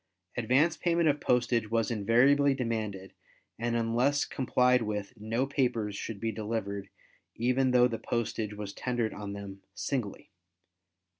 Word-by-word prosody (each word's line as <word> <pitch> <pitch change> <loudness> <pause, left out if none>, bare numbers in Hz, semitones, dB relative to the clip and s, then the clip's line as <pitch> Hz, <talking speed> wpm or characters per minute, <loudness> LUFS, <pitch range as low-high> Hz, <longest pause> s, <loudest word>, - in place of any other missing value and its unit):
Advance 130 +8 +2
payment 170 -1 +2
of 145 -1 +2
postage 120 -3 +1
was 115 0 +1
invariably 130 +6 +4
demanded 110 -6 -3 0.5
and 120 0 -1
unless 120 +5 +2
complied 125 -1 +2
with 105 0 -3
no 115 +4 -1
papers 120 -7 0
should 105 0 -5
be 115 +1 -1
delivered 100 -2 -4 0.5
even 125 +3 +2
though 125 -1 +5
the 115 -2 -4
postage 110 -2 -2
was 105 -1 -6
tendered 120 -3 -2
on 100 -1 -6
them 100 -1 -8
singly. 120 -8 -3
115 Hz, 135 wpm, -30 LUFS, 105-125 Hz, 0.5 s, though